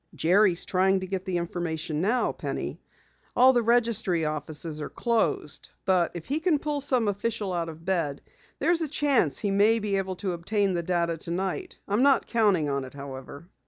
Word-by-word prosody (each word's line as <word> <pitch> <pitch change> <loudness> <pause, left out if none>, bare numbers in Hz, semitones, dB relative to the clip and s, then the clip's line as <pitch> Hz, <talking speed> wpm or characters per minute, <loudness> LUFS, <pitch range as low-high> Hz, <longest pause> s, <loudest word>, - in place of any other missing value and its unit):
"Jerry 190 +3 +4
is 170 - -5
trying 190 +1 +2
to - - -3
get 190 0 -4
the 185 -3 -1
information 165 -2 -3
now, 230 +7 +1
Penny. - - -5 0.5
All 260 +1 +7
the 240 - +3
registry 225 -8 +2
offices 155 +1 -4
are - - -4
closed, 165 - -1 0.2
but 180 -3 +3
if 170 - -6
he 290 +3 -1
can 320 -2 +2
pull 295 0 -2
some 255 -5 +2
official 205 -1 -2
out 170 -1 -2
of 165 +1 -11
bed, 165 -7 0 0.4
there's 335 +3 +2
a 320 - 0
chance 280 - +2
he 200 - -1
may 210 +3 +4 0.2
obtain 190 +1 -1
the 170 - 0
data 170 -1 0
tonight. 190 - -3
I'm 205 +4 +1
not 275 0 +4
counting 205 -9 +2
on 140 -1 -1
it, 130 +1 -10
however." 140 +3 -9
190 Hz, 175 wpm, -27 LUFS, 165-230 Hz, 0.5 s, All